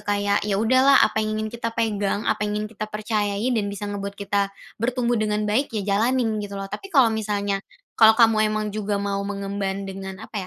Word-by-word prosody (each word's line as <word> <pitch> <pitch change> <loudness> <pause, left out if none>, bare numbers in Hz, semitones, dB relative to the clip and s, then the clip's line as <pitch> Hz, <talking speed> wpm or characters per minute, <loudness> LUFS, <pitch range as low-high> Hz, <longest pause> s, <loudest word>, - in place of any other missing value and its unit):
kayak, 205 0 +1
ya 200 - 0
udahlah 260 +5 +5
apa - - -1
yang 215 0 -2
ingin 215 0 -3
kita 235 -1 -3
pegang, 205 -2 0
apa 210 - 0
yang 210 0 -2
ingin 215 - -6
kita 215 +1 -4
percayai 210 +1 -1
dan 210 -3 0
bisa 205 +1 -5
ngebuat 200 0 -5
kita 200 0 0 0.3
bertumbuh 240 -1 0
dengan 210 0 0
baik, 250 +7 +1
ya 210 - -1 0.2
jalanin 230 -2 +1
gitu 200 -1 -7
loh. 195 - -4
Tapi 390 - -6
kalau 255 -5 +6
misalnya 205 -2 -1 0.4
kalau 220 -1 +8
kamu 220 -2 +4
emang 215 0 -1
juga 210 -1 -2
mau 200 0 -2
mengemban 200 -1 -3
dengan 190 0 -7
apa 220 - -9
210 Hz, 200 wpm, -23 LUFS, 200-225 Hz, 0.4 s, kalau